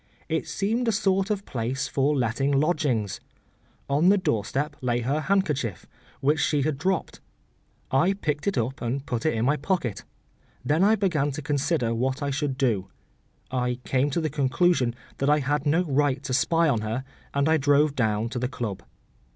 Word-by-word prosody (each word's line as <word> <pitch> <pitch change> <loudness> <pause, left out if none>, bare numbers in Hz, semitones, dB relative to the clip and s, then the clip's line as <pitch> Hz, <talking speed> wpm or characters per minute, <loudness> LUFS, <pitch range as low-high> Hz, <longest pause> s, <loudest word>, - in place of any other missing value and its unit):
It 160 0 -1
seemed 215 +9 -1
a - - +4
sort 195 -2 +1
of 205 -1 -2
place 125 +2 -2
for 140 +2 +1
letting 130 +3 0
lodgings. 140 - 0 0.7
On 150 +6 +3
the 205 - +5
doorstep 145 - -1
lay 120 -1 0
her 135 +6 0
handkerchief, 150 - 0 0.4
which 150 +3 +2
she 145 -1 +2
had 145 -2 -1
dropped. 185 +3 -1 0.7
I 170 +9 +3
picked 150 -4 -3
it 200 - 0
up 125 +3 -2
and 130 +4 -2
put 120 0 -2
it 155 - +1
in 110 +1 0
my 145 +3 +2
pocket. 145 - -2 0.6
Then 155 +5 +2
I 215 +2 +5
began 170 -9 +1
to 155 +2 -6
consider 145 -4 0
what 130 +5 -1
I 140 - -1
should 140 -1 -2
do. 115 -9 +1 0.6
I 125 -1 0
came 135 +2 +1
to 155 +4 -1
the 155 -2 -2
conclusion 135 -2 +2 0.2
that 140 - +1
I 150 - +5
had 145 +1 -1
no 165 +5 +3
right 145 -3 +1
to 130 - -3
spy 165 +6 +3
on 120 -7 +1
her, 110 +4 -3 0.3
and 140 +1 +2
I 160 0 +4
drove 145 0 +3
down 110 -2 +1
to 120 - -4
the 125 0 -1
club. 115 -7 -4
140 Hz, 185 wpm, -26 LUFS, 125-160 Hz, 0.7 s, the